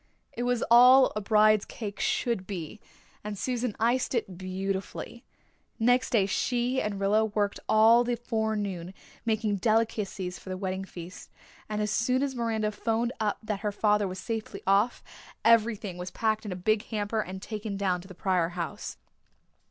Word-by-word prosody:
It 240 - -5
was 245 -1 +1
all 250 +2 +8
a 210 - -1
bride's 215 0 +4
cake 205 -4 -7
should 230 -7 0
be, 185 0 -6 0.4
and 210 -1 -5
Susan 245 -1 -2
iced 245 +3 +1
it 195 -6 -2
beautifully. 190 +5 -4 0.5
Next 245 +2 +3
day 215 -6 +3
she 245 +6 0
and 205 -2 -3
Rilla 205 +2 +3
worked 205 -2 -1
all 225 +2 +6
the 240 0 0
forenoon, 210 -6 -3 0.3
making 220 -2 0
delicacies 210 -4 0
for - - -11
the 185 - -3
wedding 190 0 -3
feast, 175 -1 -10 0.4
and 210 0 -1
as 210 - -1
soon 250 +4 +1
as 280 -1 -1
Miranda 225 -3 -1
phoned 230 +3 -1
up 210 -2 0
that 210 -2 -3
her 210 0 -2
father 210 0 +2
was 185 0 -6
safely 215 0 -5
off 200 +5 +2 0.4
everything 220 -5 +3
was 180 +1 -4
packed 215 +1 -1
in - - -4
a - - -3
big 210 +4 0
hamper 215 0 -2
and 190 -1 -6
taken 210 0 -5
down 185 -3 0
to 185 - -13
the 185 - -11
Pryor 180 -2 +1
house. 180 +5 -5
210 Hz, 165 wpm, -28 LUFS, 195-230 Hz, 0.5 s, all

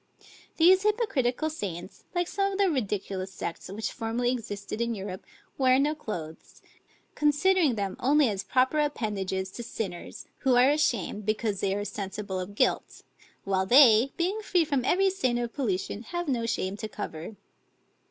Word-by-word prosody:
These 370 +3 +6
hypocritical 320 - 0
saints, 190 - -6
like 350 -1 +1
some 395 +1 0
of - - -3
the 395 -3 +3
ridiculous 200 -7 -2
sects 170 -1 -6
which 215 +3 -4
formerly 235 +2 -1
existed 210 -3 -5
in 235 0 0
Europe, 190 -2 -6 0.4
wear 260 -1 +5
no 290 +3 +2
clothes; 170 - -8 0.5
considering 300 0 +3
them 200 -3 -2
only 285 +2 +4
as 195 -3 -2
proper 260 +4 +2
appendages 195 -9 -2
to 240 - -7
sinners, 195 -6 -6
who 260 -2 +3
are 250 +3 +6
ashamed, 235 - 0
because 215 -2 0
they 195 0 0
are 205 0 -3
sensible 195 -1 -4
of 185 +2 -6
guilt; - - 0 0.4
while 190 -1 0
they, 245 0 +7
being 375 +5 0
free 360 -5 +2
from 280 -4 0
every 385 +5 +3
stain 260 -11 0
of 240 -1 -3
pollution, 205 -5 -2
have 345 +8 -4
no 235 -4 0
shame 190 -3 -1
to 220 - -5
cover. 205 -2 -7
235 Hz, 160 wpm, -28 LUFS, 200-295 Hz, 0.5 s, they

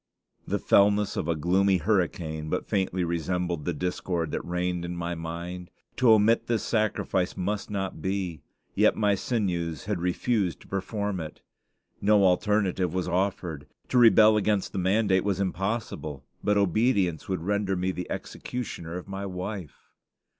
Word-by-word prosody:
The - - 0
fellness 100 0 +3
of - - -2
a 85 - +1
gloomy 95 +5 +3
hurricane 85 -5 -1
but - - -1
faintly 95 -2 0
resembled 85 -1 -2
the 90 - 0
discord 85 0 -2
that - - -3
reigned 90 0 -2
in 85 0 -4
my 85 0 -2
mind. 85 +2 -6 0.3
To 125 -3 +6
omit 110 +2 +3
this 115 -2 0
sacrifice 105 -4 0
must 100 +3 -2
not 95 -5 -3
be; 95 -5 -2 0.3
yet - - +4
my 105 -2 +2
sinews 90 -7 -2
had 100 -3 -1
refused 90 +1 0
to - - -16
perform 100 0 -2
it. 80 -2 -7 0.6
No 105 0 +4
alternative 95 -2 +2
was 95 - -1
offered. 90 -5 -2 0.2
To 125 - +3
rebel 110 -2 +7
against 105 -2 +1
the - - -3
mandate 95 0 +2
was 100 -2 0
impossible; 95 - -3 0.2
but 105 0 +2
obedience 100 - +1
would 95 -3 -2
render 100 0 0
me 90 +1 0
the 90 -1 -6
executioner 90 -8 -5
of 90 - -8
my 100 0 -5
wife. 90 - -7
95 Hz, 155 wpm, -27 LUFS, 85-105 Hz, 0.6 s, rebel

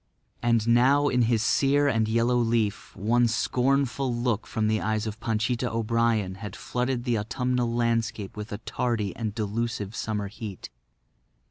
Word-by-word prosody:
And 115 -2 +2
now 135 +5 +4
in 125 - +2
his 115 -3 +2
sere 145 +3 +3
and 115 -5 +2
yellow 115 +2 +2
leaf 115 -3 0
one 120 +4 +2
scornful 130 +3 +1
look 120 -2 -1
from 110 -2 -1
the 110 0 +1
eyes 110 0 -1
of 110 0 -5
Panchita 120 +2 -1
O'Brien 115 -3 +1
had 105 -4 -6
flooded 125 0 -2
the 120 -3 0
autumnal 125 +2 -1
landscape 115 -4 -1
with 105 0 -7
a 105 - -3
tardy 110 -4 -2
and 110 -3 -4
delusive 110 -1 -3
summer 105 -3 -2
heat. 105 -2 -8
115 Hz, 150 wpm, -26 LUFS, 110-125 Hz, -, now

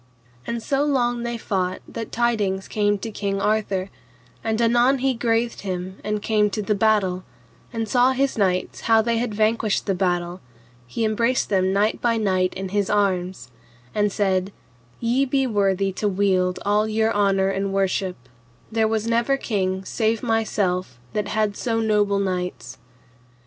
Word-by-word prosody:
And 235 -1 -3
so 275 0 +1
long 245 -4 +1
they 235 0 -3
fought 185 -4 -2
that 225 -2 -6
tidings 210 -5 0
came 205 -1 +1
to 225 +3 -6
King 200 -1 -2
Arthur, 200 -2 0 0.5
and 220 0 -1
anon 240 +3 +4
he 265 0 0
graithed 230 0 0
him 185 -1 -5
and 210 0 -2
came 210 -2 +2
to 210 +2 -3
the 210 - +1
battle, 200 -3 +2 0.5
and 225 -1 -3
saw 250 +3 +4
his 270 +1 0
knights 185 -4 0
how 225 -1 +6
they 230 0 +1
had 230 -3 -2
vanquished 215 0 +1
the 195 - +1
battle, 175 -1 -1 0.5
he 220 - -2
embraced 230 +4 +1
them 190 -1 +2
knight 205 +3 +1
by 235 -1 +2
knight 185 -4 +1
in 190 0 -4
his 200 0 0
arms, 190 -7 0 0.4
and 210 -1 +1
said, 190 -1 0 0.5
Ye 240 +4 +2
be 270 0 +1
worthy 195 -4 +1
to 200 +3 -2
wield 185 -2 +1
all 210 +1 +2
your 220 +1 +1
honour 195 -1 +2
and 195 0 -1
worship; 195 -1 0 0.6
there 220 0 +2
was 220 0 -1
never 235 +4 +2
king 190 -6 -2
save 225 +1 0
myself 195 - 0 0.2
that 210 -1 -1
had 215 -1 0
so 225 0 -1
noble 210 -2 +2
knights. 180 -9 -3
210 Hz, 160 wpm, -23 LUFS, 190-230 Hz, 0.6 s, how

